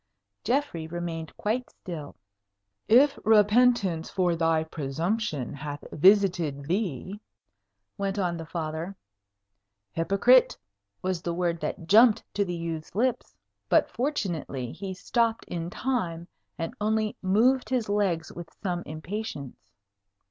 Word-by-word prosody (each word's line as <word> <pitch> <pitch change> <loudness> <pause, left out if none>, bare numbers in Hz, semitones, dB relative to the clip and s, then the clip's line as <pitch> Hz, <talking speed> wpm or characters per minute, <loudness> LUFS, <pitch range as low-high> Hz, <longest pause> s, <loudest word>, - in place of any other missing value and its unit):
Geoffrey 240 - -1
remained 165 -1 -5
quite 240 +4 -1
still. 155 -5 -8 0.7
"If 270 +6 +5
repentance 210 -5 +4
for 180 -3 +1
thy 165 -1 +2
presumption 160 - -2
hath 145 0 -6
visited 175 -5 +3
thee 185 - -2 0.4
" 100 0 -54
went 195 0 -1
on 180 -3 0
the 165 -1 -7
Father. 165 +3 -4 1.0
"Hypocrite!" 200 +9 +4 0.5
was 185 -2 -1
the 170 -1 -3
word 170 -1 0
that 165 - -4
jumped 220 +4 +6
to 205 - +1
the 175 -3 -3
youth's 165 -1 -5
lips; 245 +2 0 0.3
but - - +3
fortunately 170 - -2
he 190 +3 -6
stopped 230 +4 0
in 170 -1 -4
time, 180 -9 -2 0.3
and 165 0 -4
only 215 0 +1
moved 230 +8 +3
his 250 -4 0
legs 195 -6 0
with 170 -1 -9
some 175 -3 -1
impatience. 155 - -6
180 Hz, 120 wpm, -27 LUFS, 160-215 Hz, 1.0 s, jumped